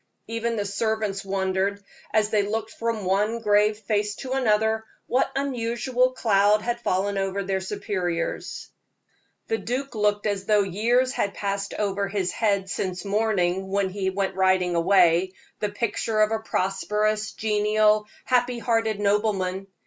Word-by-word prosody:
Even 230 +1 -2
the 205 -2 -2
servants 215 -1 -1
wondered, 195 +1 -1 0.3
as 215 -1 +2
they 210 - +3
looked 215 +2 -3
from 230 -3 -3
one 205 +5 +1
grave 210 -1 +3
face 210 -1 -1
to 260 - -7
another, 220 -4 +2 0.2
what 255 - +1
unusual 250 -1 0
cloud 210 -3 +3
had 240 0 -2
fallen 195 0 0
over 195 +1 -1
their 190 0 -1
superiors. 185 -3 -3 0.8
The 225 - -1
duke 250 +7 -3
looked 210 -1 +1
as 200 -2 -1
though 210 -2 +4
years 235 +7 +1
had 200 -6 -2
passed 200 0 -3
over 200 -1 -1
his 195 -2 -1
head 200 -3 0
since 190 -1 -3
morning, 195 -3 0
when 195 -1 0
he 190 -1 -1
went 190 0 -1
riding 185 -1 +2
away, 175 +1 +4 0.3
the 210 - -1
picture 215 +1 -1
of 215 0 +3
a 225 - 0
prosperous, 210 +1 -1
genial, 210 0 +2 0.2
happy 250 -1 +2
hearted 225 -3 0
nobleman. 200 -2 0
210 Hz, 145 wpm, -25 LUFS, 195-220 Hz, 0.8 s, though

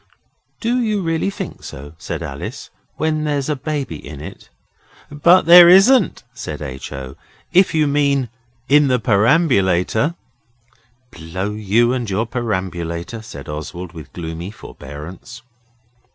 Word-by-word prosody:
'Do 245 +2 +1
you 215 -4 0
really 165 +2 0
think 200 - -7
so,' 70 +3 -9
said - - -5
Alice, - - -7 0.2
'when 155 0 -1
there's 145 -2 -1
a 150 - +1
baby 140 - -4
in 70 -1 -9
it?' 85 +6 -10 0.6
'But 170 +5 +5
there 175 +1 +10
isn't,' 195 +5 +5
said - - -6
H. 65 -2 -7
O., 65 -1 -7 0.4
'if 185 -2 +4
you 155 -1 +3
mean 140 -2 +1 0.4
in 145 +1 +5
the 130 -1 +3
perambulator.' 110 - +2 1.0
'Blow 90 +3 -5
you 110 +3 +2
and 120 -4 -3
your 100 +4 0
perambulator,' 95 -3 -4
said 70 -10 -10
Oswald, 80 +4 -6
with 80 -3 -11
gloomy 85 +1 -6
forbearance. 90 - -10
115 Hz, 130 wpm, -19 LUFS, -, 1.0 s, there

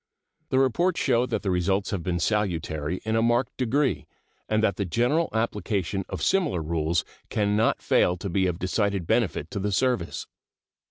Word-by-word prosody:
The 130 - +1
reports 165 +8 +2
show 125 -2 +2
that - - -2
the 95 - 0
results 95 +3 0
have 100 -4 -2
been 85 +1 -1
salutary 85 -5 -1
in 110 0 0
a 115 - +3
marked 120 +1 +1
degree, 130 +2 0 0.4
and 110 0 +2
that 100 -4 +2
the 100 - 0
general 120 - +1
application 100 -4 -1
of - - -4
similar 155 - +1
rules 80 +1 0 0.2
can 105 -1 +1
not 110 +2 +1
fail 90 - +3
to 100 - -5
be 95 +1 +1
of 90 -2 -2
decided 100 0 0
benefit - - 0
to - - -3
the 100 +1 -1
service. 120 -4 0
100 Hz, 175 wpm, -26 LUFS, 90-120 Hz, 0.4 s, a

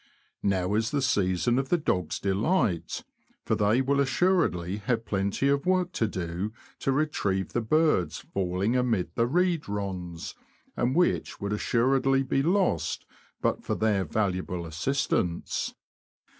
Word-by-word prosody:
Now 95 -1 +1
is 110 +2 +1
the 145 - 0
season 105 +1 +2
of 135 0 -3
the 175 - +4
dogs' 90 - -1
delight, 100 - 0 0.4
for - - +1
they 105 +5 +3
will 140 +1 +1
assuredly 135 - +1
have 115 +2 -1
plenty 100 +6 0
of 140 +3 +1
work 185 -1 +2
to 115 - 0
do 90 +2 -4 0.3
to 135 - 0
retrieve 105 - 0
the 120 - +1
birds 150 - +2 0.2
falling 95 +4 0
amid 115 -9 0
the 115 +4 +1
reed 175 - +1
ronds, 95 -4 -4 0.4
and 125 +3 0
which 175 +1 +1
would 100 +1 -2
assuredly 135 +5 +2
be 135 +1 +1
lost 185 +5 +1 0.4
but - - 0
for - - -1
their 105 -3 +1
valuable 90 -1 -1
assistance. 85 - -1
110 Hz, 140 wpm, -27 LUFS, 95-135 Hz, 0.4 s, the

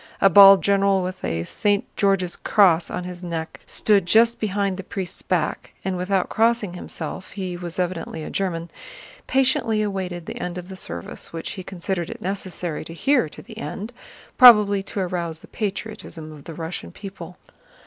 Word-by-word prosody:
A 195 - +5
bald 195 +1 +9
general 195 -1 +3
with 185 +1 -5
a 80 0 -1
St. 205 - 0
George's 195 -3 +1
Cross 175 -6 +3
on 180 - -4
his 180 0 -7
neck 165 -2 -5
stood 200 -4 +2
just 230 +4 +4
behind 200 -2 -1
the 190 - -6
priest's 185 -2 -6
back, 175 -4 -2
and 190 -1 -1
without 185 +1 0
crossing 225 -4 +1
himself 175 0 -6
(he 185 -3 -4
was 175 -1 -7
evidently 175 -3 -3
a - - -6
German) 170 -3 -2 0.6
patiently 255 -5 +2
awaited 185 -4 -3
the - - -6
end 180 0 -4
of 180 +1 -7
the 190 - -7
service, 85 - -6
which 165 -1 -5
he 190 - -6
considered 180 -1 -4
it - - -7
necessary 180 -3 -4
to 165 +1 -9
hear 260 - +2
to - - -12
the 225 -2 -11
end, 220 +1 -6 0.5
probably 210 -6 +8
to 195 - -6
arouse 170 -3 -3
the - - -14
patriotism 205 -6 -5
of 150 -2 -13
the 165 - -8
Russian 160 - -6
people. 190 - -9
185 Hz, 175 wpm, -23 LUFS, 170-200 Hz, 0.6 s, bald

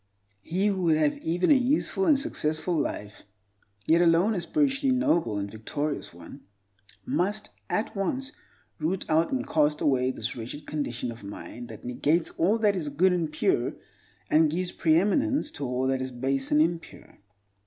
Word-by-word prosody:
He 180 - -1
who 195 -3 +1
would 160 -2 +4
have 150 -2 +1
even 175 - +1
a - - +8
useful 280 +8 +1
and 295 -4 +5
successful 170 - -1
life—yet 105 - -3
alone 175 +5 +4
a 180 - -2
spiritually 270 - +1
noble 170 - +1
and 100 0 -4
victorious 145 +7 -4
one—must 100 - -6 0.2
at 215 +1 -1
once 260 +8 -2 0.5
root 170 +5 -1
out 160 +1 +2
and 265 - -2
cast 150 -1 +2
away 130 -3 +2
this 120 -2 -4
wretched 125 +5 -7
condition 125 -5 -3
of 115 -2 -11
mind 100 +4 -8
that 110 -1 -11
negates 150 +7 0
all 200 +7 +2
that 210 -3 +2
is 160 -5 -2
good 180 +6 +3
and 165 -4 -1
pure, - - +1 0.5
and 155 +5 +4
gives 180 +3 -2
preeminence 240 - +2
to 145 -3 -5
all 125 +1 -1
that 130 0 0
is 130 - -3
base 135 +2 -2
and 150 +1 +5
impure. 170 0 -5
155 Hz, 160 wpm, -27 LUFS, 125-190 Hz, 0.5 s, a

